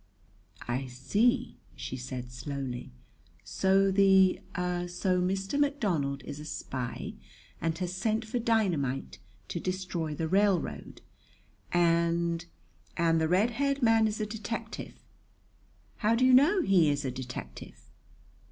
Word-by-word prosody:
"I 130 +2 -2
see," 215 - 0 0.2
she - - -5
said 125 -1 -6
slowly. 125 - -5 0.5
"So 190 - +2
the 190 -1 +5 0.2
so 180 +1 -1
Mr. 195 +7 -1
McDonald 175 - 0
is 145 +1 -7
a 150 - -8
spy 130 -5 -5 0.5
and 165 -1 -1
has 180 -1 -3
sent 220 +4 -1
for 235 +3 -2
dynamite 170 - 0 0.3
to - - -3
destroy 185 -4 -3
the 160 +2 -2
railroad! 185 - 0 0.7
And 170 0 +2 0.5
and 165 -1 +3
the 160 - +2
red 195 +8 +3
haired 275 +2 0
man 225 -1 +5
is 210 +1 -3
a 215 - 0
detective! 220 +1 -6 1.0
How 225 +1 +2
do 255 +2 +3
you 255 - +6
know 320 +9 +5
he 180 - +4
is 145 0 -1
a 130 - -1
detective?" 125 - -8
180 Hz, 125 wpm, -29 LUFS, 145-215 Hz, 1.0 s, you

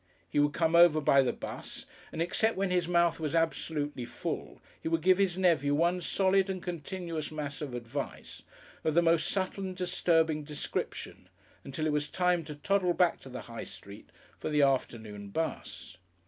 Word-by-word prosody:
He - - 0
would 145 0 +3
come 165 0 +2
over 170 -2 +7
by 140 -2 +5
the 130 - +1
'bus, - - -7 0.3
and 165 - -1
except 220 +5 +1
when 195 -1 0
his 180 -2 +1
mouth 170 -1 +3
was 155 -1 -2
absolutely 155 -4 -1
full, 120 - -5 0.2
he - - -4
would 165 -1 0
give 185 +1 +5
his 190 -3 +2
nephew 155 -6 +3
one 175 +3 +2
solid 195 +2 +2
and 190 -1 -2
continuous 170 -2 -4
mass 150 -1 -5
of 140 -5 -4
advice 120 +4 -6 0.4
of 155 - 0
the 170 - +5
most 165 -1 +3
subtle 195 0 -2
and 185 -1 -4
disturbing 165 -4 +2
description, 150 0 -5 0.3
until 140 +3 -4
it 155 - +1
was 150 0 0
time 180 -2 +1
to 150 -1 -7
toddle 180 +3 +1
back 180 -2 +3
to 135 - -12
the 125 - -6
High 115 -1 -7
Street 100 +1 -12 0.3
for - - -3
the 150 -1 +3
afternoon 110 -6 -1
'bus. 160 - -4
160 Hz, 180 wpm, -30 LUFS, 145-180 Hz, 0.4 s, over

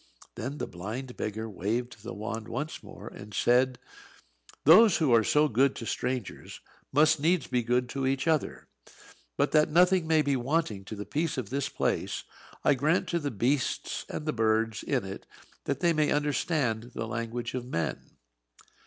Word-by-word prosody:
Then 130 +5 -5
the - - -3
blind 110 +9 -6
beggar 110 +1 -4
waved 110 +4 -3
the 115 +3 -7
wand 110 0 -5
once 150 +6 -4
more - - -11
and 105 0 -10
said; 125 +3 +3 0.9
"Those 190 +6 +7
who 150 -7 +2
are 115 -1 +6
so 150 +7 +3
good 135 +2 +2
to 115 - -6
strangers 125 -2 -4 0.3
must 155 +2 +4
needs 170 +3 +2
be 125 - 0
good 125 +1 +1
to 135 +1 -2
each 135 +3 0
other. 160 -3 0 0.7
But - - +2
that 155 0 +4
nothing 180 +1 +4
may 160 -1 +4
be 140 -1 +1
wanting 125 -6 -1
to 110 - -7
the 105 0 -6
peace 150 - -1
of 120 -5 -4
this 140 0 -1
place, - - -1 0.4
I 145 - +5
grant 150 +7 +1
to 170 - 0
the 145 -3 -2
beasts 125 +3 -1
and 150 - -5
birds 110 0 +1
in 130 -7 -1
it 95 0 -8 0.4
that - - -2
they 170 -1 +3
may 155 -1 +2
understand 140 -5 0
the - - -3
language 115 +1 -4
of 125 -1 -3
men." 85 -10 -3
130 Hz, 170 wpm, -28 LUFS, 115-150 Hz, 0.9 s, Those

